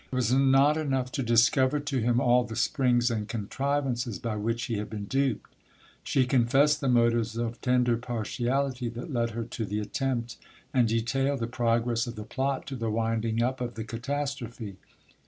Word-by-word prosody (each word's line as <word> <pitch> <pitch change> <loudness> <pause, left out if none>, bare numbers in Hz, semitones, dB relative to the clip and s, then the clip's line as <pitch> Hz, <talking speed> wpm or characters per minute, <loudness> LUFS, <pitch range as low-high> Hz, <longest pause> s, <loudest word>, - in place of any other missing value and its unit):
It - - -3
was 125 -1 +1
not 135 +3 +4
enough 135 -4 -1
to 135 - -2
discover 130 +4 +3
to 140 -2 -2
him 120 +1 +2
all 125 0 +4
the 110 -1 -7
springs 120 0 +2
and 105 -2 -2
contrivances 125 0 -2
by 115 +2 -3
which 115 +3 -2
he 115 -4 -2
had 105 - -5
been 105 -2 -5
duped; 135 +1 -1 0.5
she 130 -2 +2
confessed 135 +4 +3
the 135 - 0
motives 115 -2 +2
of 115 0 -3
tender 125 -2 +2
partiality 125 +2 -2
that 120 +5 -7
led 115 -1 +1
her 115 - -1
to 115 0 -5
the 105 0 -2
attempt, 120 0 -2 0.4
and 125 -3 +4
detailed 125 +5 0
the 115 - -1
progress 120 0 0
of 120 - -6
the 105 - -6
plot 135 +4 -2
to 135 - -5
the 115 -2 -2
winding 115 +1 0
up 130 +1 -1
of 120 -1 -3
the 110 - -4
catastrophe. 120 -3 -4
120 Hz, 180 wpm, -28 LUFS, 115-135 Hz, 0.5 s, not